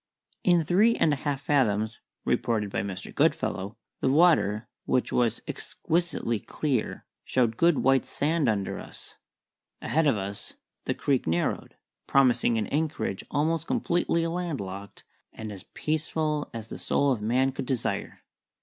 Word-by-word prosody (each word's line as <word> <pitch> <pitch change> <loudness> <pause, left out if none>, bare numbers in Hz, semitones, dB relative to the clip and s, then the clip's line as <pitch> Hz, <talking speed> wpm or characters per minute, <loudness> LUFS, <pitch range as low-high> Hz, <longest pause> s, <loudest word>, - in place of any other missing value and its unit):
In 175 -2 +4
three 210 +9 +4
and 155 - +3
a - - +2
half 140 0 -2
fathoms 110 -7 +1 0.3
(reported 105 -4 0
by - - 0
Mr. 95 -2 -6
Goodfellow) 100 +3 0 0.2
the - - +1
water, 135 - +4 0.2
which 125 - +1
was 120 -2 +1
exquisitely 165 -9 -1
clear, 135 -3 -2 0.2
showed 120 -3 +1
good 170 +3 +3
white 135 0 +3
sand 150 -2 +1
under 100 -3 -1
us. - - -12 0.6
Ahead 155 +6 +1
of 135 - +3
us 100 +1 -6 0.3
the - - 0
creek 135 - 0
narrowed, 85 +2 -1 0.3
promising 125 -3 +4
an 110 - 0
anchorage 145 -10 -1
almost 155 +2 0
completely 170 -1 +1
landlocked 140 - -4 0.3
and 110 -1 -6
as 95 -3 -10
peaceful 155 -1 -1
as 115 -1 -7
the - - -7
soul 140 -1 +2
of 120 -5 -1
man 125 +5 +2
could 130 - -5
desire. 130 -4 -2
130 Hz, 140 wpm, -27 LUFS, 110-155 Hz, 0.6 s, In